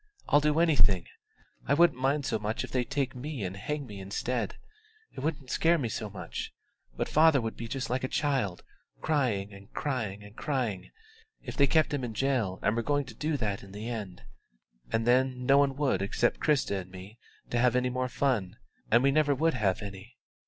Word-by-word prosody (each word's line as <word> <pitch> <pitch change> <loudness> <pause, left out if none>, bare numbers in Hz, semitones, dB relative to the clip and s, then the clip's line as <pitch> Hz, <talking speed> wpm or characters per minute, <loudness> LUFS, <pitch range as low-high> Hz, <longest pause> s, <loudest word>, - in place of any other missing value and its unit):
I'll 145 - +5
do 150 +1 +2
anything; 105 - +4 0.6
I 140 - +4
wouldn't 170 -4 +4
mind 135 +2 +1
so - - 0
much 105 +2 -2
if - - -7
they'd 125 -2 -1
take 135 -3 -1
me 130 -2 -5
and 95 0 -3
hang 145 +8 -3
me 105 -5 -9
instead 105 +3 -2 0.6
it - - -6
wouldn't 140 -2 -3
scare 170 +1 +3
me 125 -7 -2
so 110 0 -4
much: 90 -4 -6 0.5
but - - -1
father 155 -2 +5
would 115 -2 -3
be 115 - -6
just 125 0 -3
like 125 +1 -1
a - - +1
child, 130 - -1 0.4
crying 115 -10 0
and 100 +1 -14
crying 110 -8 -2
and 105 +1 -13
crying, 125 -10 -2 0.5
if - - -6
they 140 - +4
kept 155 +1 +3
him 140 -3 -1
in 115 -3 -4
jail 120 -8 0
and 105 - +2
were 115 - +1
going 145 +3 0
to 125 - -10
do 150 +5 -1
that 105 -5 -2
in 100 0 -13
the 105 +3 -5
end. 100 - -6 0.7
And 115 - +1
then 125 +1 +2
no 140 +2 +6
one 140 -1 +2
would 135 -9 +1
expect 110 +4 +1
Christa 135 -10 +1
and 90 - -13
me 95 +5 -11 0.3
to 120 - +1
have 125 0 +3
any 125 0 +2
more 130 0 -1
fun, 120 -9 0 0.3
and 120 +3 +5
we 140 - +5
never 145 -1 +3
would 160 +4 +2
have 105 -4 0
any. 100 +4 -9
125 Hz, 205 wpm, -29 LUFS, 105-140 Hz, 0.7 s, no